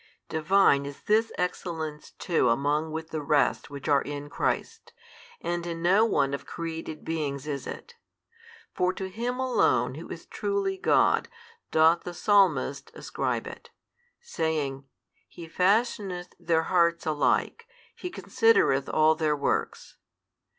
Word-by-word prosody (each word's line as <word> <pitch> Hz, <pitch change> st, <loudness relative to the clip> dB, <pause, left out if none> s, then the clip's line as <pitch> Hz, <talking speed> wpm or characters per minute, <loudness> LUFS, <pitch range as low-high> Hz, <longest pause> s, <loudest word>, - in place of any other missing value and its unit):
Divine 160 Hz, -3 st, +3 dB
is 140 Hz, -, -10 dB
this 220 Hz, +2 st, +2 dB
excellence 160 Hz, -4 st, -4 dB
too 170 Hz, -3 st, 0 dB
along 145 Hz, +6 st, +1 dB
with 160 Hz, +1 st, -6 dB
the 155 Hz, -, -3 dB
rest 145 Hz, 0 st, +1 dB
which 140 Hz, 0 st, -8 dB
are 145 Hz, -2 st, +4 dB
in 145 Hz, 0 st, -6 dB
Christ, -, -, -3 dB, 0.5 s
and 175 Hz, 0 st, -2 dB
in 165 Hz, 0 st, -5 dB
no 195 Hz, +6 st, +5 dB
one 140 Hz, -10 st, +1 dB
of 140 Hz, -, -4 dB
created 165 Hz, -2 st, -6 dB
beings 150 Hz, -4 st, -3 dB
is 140 Hz, -3 st, -4 dB
it. 475 Hz, -, -8 dB, 0.8 s
For 180 Hz, 0 st, +1 dB
to 190 Hz, 0 st, -5 dB
Him 240 Hz, +5 st, -3 dB
Alone 260 Hz, -1 st, +2 dB
Who -, -, -9 dB
is -, -, -8 dB
truly 400 Hz, -1 st, -2 dB
God -, -, +3 dB, 0.4 s
doth 160 Hz, +2 st, +4 dB
the 175 Hz, -, -7 dB
Psalmist 180 Hz, -10 st, +2 dB
ascribe -, -, -3 dB
it, -, -, -10 dB, 0.5 s
saying, 155 Hz, -, -2 dB, 0.4 s
He 170 Hz, -, -11 dB
fashioneth 190 Hz, 0 st, 0 dB
their 165 Hz, -2 st, +1 dB
hearts 170 Hz, -2 st, +2 dB
alike, 155 Hz, -, 0 dB, 0.3 s
He 360 Hz, -, -6 dB
considereth 355 Hz, -, +2 dB
all 155 Hz, 0 st, +4 dB
|166 -, -, -20 dB
their 155 Hz, -2 st, +2 dB
works. 140 Hz, -, -2 dB
165 Hz, 135 wpm, -27 LUFS, 150-190 Hz, 0.8 s, no